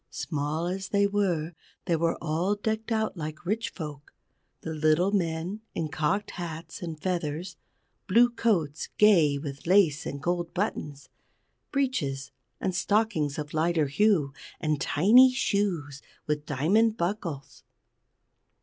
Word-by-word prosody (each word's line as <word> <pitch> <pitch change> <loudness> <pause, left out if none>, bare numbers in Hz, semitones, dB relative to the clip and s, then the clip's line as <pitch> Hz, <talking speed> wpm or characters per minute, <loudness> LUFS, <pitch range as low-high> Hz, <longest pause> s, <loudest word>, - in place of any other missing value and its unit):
Small 155 +1 -3
as 190 +2 -3
they 200 0 +3
were, 180 -5 0 0.3
they 170 - +2
were 165 +1 0
all 170 +5 0
decked 220 +2 -3
out 220 -2 0
like 155 -1 -6
rich 215 +5 -1
folk, 150 -4 -8 0.5
the 160 - -5
little 155 +5 +2
men 175 +1 -1
in 160 -2 -2
cocked 165 +8 -1
hats 165 -2 -7
and 165 -3 -5
feathers, 170 0 -3 0.5
blue 240 +5 +5
coats 170 -11 0
gay 170 -9 +5
with 140 0 -7
lace 170 -5 +4
and 140 - -5
gold 175 +2 -2
buttons, 150 -7 -3 0.6
breeches 180 - -1 0.3
and 185 - -1
stockings 195 -7 +1
of 150 -1 -5
lighter 160 0 +2
hue, 150 -2 +2 0.3
and 155 -2 -1
tiny 235 - +6
shoes 185 - -1 0.2
with 150 0 -2
diamond 205 - +2
buckles. 170 -7 -4
170 Hz, 130 wpm, -27 LUFS, 150-205 Hz, 0.6 s, tiny